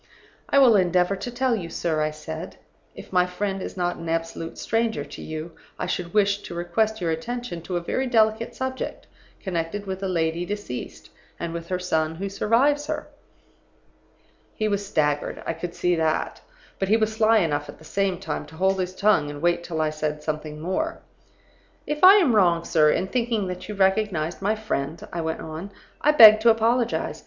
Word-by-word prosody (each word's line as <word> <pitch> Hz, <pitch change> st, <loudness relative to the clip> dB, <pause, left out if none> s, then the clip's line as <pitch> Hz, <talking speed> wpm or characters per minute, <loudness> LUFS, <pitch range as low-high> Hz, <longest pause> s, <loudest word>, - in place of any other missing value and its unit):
"'I -, -, +3 dB
will 255 Hz, -5 st, +7 dB
endeavor 180 Hz, +1 st, +2 dB
to 245 Hz, -, -6 dB
tell 245 Hz, 0 st, 0 dB
you, 175 Hz, -6 st, -5 dB
sir,' 160 Hz, -2 st, -1 dB
I 155 Hz, -, +1 dB
said. 155 Hz, -, -7 dB, 0.4 s
'If -, -, -11 dB
my 180 Hz, 0 st, +4 dB
friend 195 Hz, +1 st, -3 dB
is -, -, -6 dB
not 175 Hz, -1 st, -1 dB
an 165 Hz, -, -6 dB
absolute 165 Hz, 0 st, -3 dB
stranger 225 Hz, 0 st, -1 dB
to -, -, -10 dB
you, 155 Hz, +1 st, -6 dB, 0.3 s
I -, -, -3 dB
should 180 Hz, -1 st, -3 dB
wish 200 Hz, -1 st, +2 dB
to -, -, -8 dB
request 215 Hz, +6 st, 0 dB
your 170 Hz, -3 st, -1 dB
attention 225 Hz, +2 st, -4 dB
to 175 Hz, +2 st, -3 dB
a -, -, -2 dB
very 260 Hz, +9 st, -1 dB
delicate 220 Hz, -1 st, +2 dB
subject, 260 Hz, 0 st, -4 dB, 0.4 s
connected 185 Hz, +2 st, -3 dB
with 190 Hz, 0 st, -5 dB
a 195 Hz, -, -1 dB
lady 165 Hz, -1 st, 0 dB
deceased, 195 Hz, -10 st, -6 dB, 0.3 s
and 170 Hz, -1 st, -4 dB
with 170 Hz, 0 st, -6 dB
her 185 Hz, -, -1 dB
son 160 Hz, -3 st, -1 dB
who 195 Hz, +4 st, -4 dB
survives 265 Hz, +9 st, +2 dB
her.' -, -, -4 dB, 1.5 s
"He 215 Hz, -, 0 dB
was 205 Hz, -1 st, -1 dB
staggered; 150 Hz, -6 st, -1 dB
I -, -, -1 dB
could 170 Hz, +1 st, -6 dB
see 180 Hz, -, +1 dB
that. 160 Hz, -2 st, -1 dB, 0.4 s
But 195 Hz, -, 0 dB
he 220 Hz, -, +5 dB
was 220 Hz, -1 st, 0 dB
sly 220 Hz, 0 st, +4 dB
enough 145 Hz, -7 st, 0 dB
at -, -, -10 dB
the 160 Hz, -, -16 dB
same 195 Hz, +2 st, 0 dB
time 150 Hz, -, -4 dB
to 160 Hz, -, -14 dB
hold 190 Hz, +3 st, +1 dB
his 185 Hz, 0 st, -3 dB
tongue 200 Hz, -8 st, +3 dB
and 145 Hz, 0 st, -7 dB
wait 175 Hz, +2 st, +1 dB
till 160 Hz, -2 st, -3 dB
I 155 Hz, -1 st, +1 dB
said 150 Hz, 0 st, -3 dB
something 155 Hz, -1 st, -4 dB
more. 190 Hz, -, -2 dB, 0.9 s
"'If 300 Hz, +2 st, -4 dB
I 380 Hz, +2 st, +10 dB
am 325 Hz, -, +4 dB
wrong, 170 Hz, -4 st, +3 dB
sir, 155 Hz, -2 st, +4 dB
in 180 Hz, -, +1 dB
thinking 230 Hz, -1 st, -1 dB
that 180 Hz, +3 st, -7 dB
you 210 Hz, -, -4 dB
recognized 190 Hz, -4 st, +1 dB
my 210 Hz, +3 st, +1 dB
friend,' 160 Hz, -8 st, -4 dB
I 170 Hz, -, -2 dB
went 160 Hz, 0 st, -3 dB
on, 160 Hz, +5 st, -7 dB, 0.3 s
'I 300 Hz, -, +4 dB
beg 215 Hz, -6 st, +10 dB
to 230 Hz, +2 st, +4 dB
apologize. 230 Hz, +2 st, +1 dB
185 Hz, 195 wpm, -24 LUFS, 165-220 Hz, 1.5 s, I